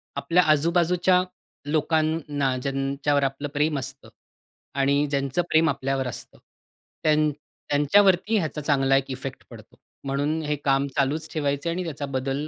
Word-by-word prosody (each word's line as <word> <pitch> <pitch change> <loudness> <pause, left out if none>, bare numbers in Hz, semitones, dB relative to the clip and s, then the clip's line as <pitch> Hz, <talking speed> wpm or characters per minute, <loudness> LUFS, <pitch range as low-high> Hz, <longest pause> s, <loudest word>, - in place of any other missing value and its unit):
आपल्या 180 +2 +2
आजूबाजूच्या 175 +4 +3 0.5
लोकांना 155 -3 0
ज्यांच्यावर 140 +2 -1
आपलं 135 +2 -2
प्रेम 150 0 +1
असतं 130 - -8 0.7
आणि 140 +2 +3
ज्यांचं 140 +2 0
प्रेम 160 0 +4
आपल्यावर 135 -1 -1
असतं. 120 - -8 0.7
त्यां 155 0 +3 0.4
त्यांच्यावरती 190 +8 +3
ह्याचा 155 -4 -2
चांगला 135 -2 +2
एक 135 0 -3
इफेक्ट 130 0 -6
पडतो, - - -14 0.3
म्हणून 145 +3 -1
हे 150 0 -1
काम 135 0 +2
चालूच 150 +3 0
ठेवायचंय 145 +1 -1
आणि 180 +2 -2
त्याचा 150 -4 -5
बदल 135 +2 -3
145 Hz, 130 wpm, -24 LUFS, 135-160 Hz, 0.7 s, प्रेम